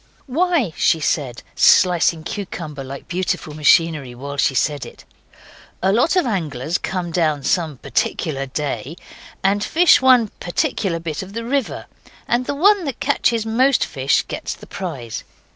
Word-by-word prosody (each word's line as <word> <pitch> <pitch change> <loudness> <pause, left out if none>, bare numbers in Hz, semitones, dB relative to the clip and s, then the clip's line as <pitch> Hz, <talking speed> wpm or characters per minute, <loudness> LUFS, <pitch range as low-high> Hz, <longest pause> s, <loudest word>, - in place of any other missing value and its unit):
'Why,' 300 - +1
she 165 - +2
said, 140 -5 -2
slicing 175 -3 +4
cucumber 170 -6 -6
like 135 +1 -9
beautiful 180 -4 -2
machinery 150 -3 +2
while 140 +3 -6
she 135 -1 +2
said 145 +1 0
it, - - -12 0.8
'a 190 - +3
lot 245 - +2
of 365 - +3
anglers 165 - -2
come 180 -2 -3
down 155 -4 0
some 160 0 0
particular 135 +1 -2
day 140 0 -4 0.5
and 200 +2 +2
fish 345 +8 +5
one 250 -4 +5
particular 180 - -1
bit 165 -2 -4
of 190 +1 -9
the 230 +1 -4
river. 270 0 -2 0.4
And 245 +1 0
the 285 - -1
one 390 +4 +4
that 275 -4 -4
catches 230 -2 +1
most 255 +5 +3
fish - - 0
gets - - -5
the - - -13
prize. 135 - -6
175 Hz, 150 wpm, -20 LUFS, 150-235 Hz, 0.8 s, fish